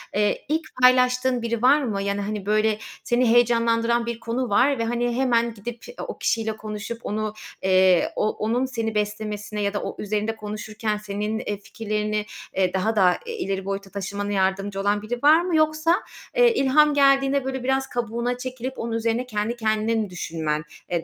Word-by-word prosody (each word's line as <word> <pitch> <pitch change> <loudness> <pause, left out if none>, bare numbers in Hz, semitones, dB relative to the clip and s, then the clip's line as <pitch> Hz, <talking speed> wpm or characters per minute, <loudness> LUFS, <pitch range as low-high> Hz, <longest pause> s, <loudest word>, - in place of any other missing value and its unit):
Eee, 210 0 +1
ilk 315 +2 +1 0.2
paylaştığın 250 0 +4
biri 235 -1 -2
var 280 +4 +5
mı? 210 -6 -2
Yani, 200 0 -1
hani, 205 -1 -4
böyle, 215 +1 +2 0.3
seni 240 0 +2
heyecanlandıran 235 0 +3
bir 235 -1 -4
konu 235 +2 -2
var 255 +6 +3
ve, 230 - 0
hani, 240 +1 -1
hemen 235 -2 +2
gidip 230 +3 -8
e, 485 - -9
o - - -6
kişiyle 220 -1 -1
konuşup, 215 +2 -6
onu, 215 0 -2 0.3
eee, 185 -2 +4
o 215 - +1
onun 230 +5 -1
seni 230 -4 -3
beslemesine 210 0 -3
ya 200 0 0
da 205 - -2
o, - - -4
üzerinde 215 +2 -1
konuşurken 215 0 -4
senin, 210 +1 -3
eee, 205 -3 -3
fikirlerini, 210 0 -3 0.3
eee, 185 -1 +1
daha 210 +4 0
da, 185 -3 +4
eee, 465 -1 -5
ileri 195 - -3
boyuta 195 0 -4
taşımana 200 +1 -4
yardımcı 195 0 0
olan 205 +1 +1
biri 240 +4 -5
var 310 +3 +7
mı? 350 -1 -1
Yoksa, 310 +2 +3 0.4
eee, - - +5
ilham 300 -2 +4
geldiğinde, 275 -1 +4
böyle, 265 -1 -3
biraz 265 +1 +1
kabuğuna 240 +1 -2
çekilip 255 0 -5
onun 230 0 -3
üzerine 230 +2 0
kendi 215 0 -2
kendine 220 0 0
mi 215 -3 -1
düşünmen, 160 -4 -3 0.3
eee, 170 -2 -1
225 Hz, 180 wpm, -24 LUFS, 205-250 Hz, 0.4 s, var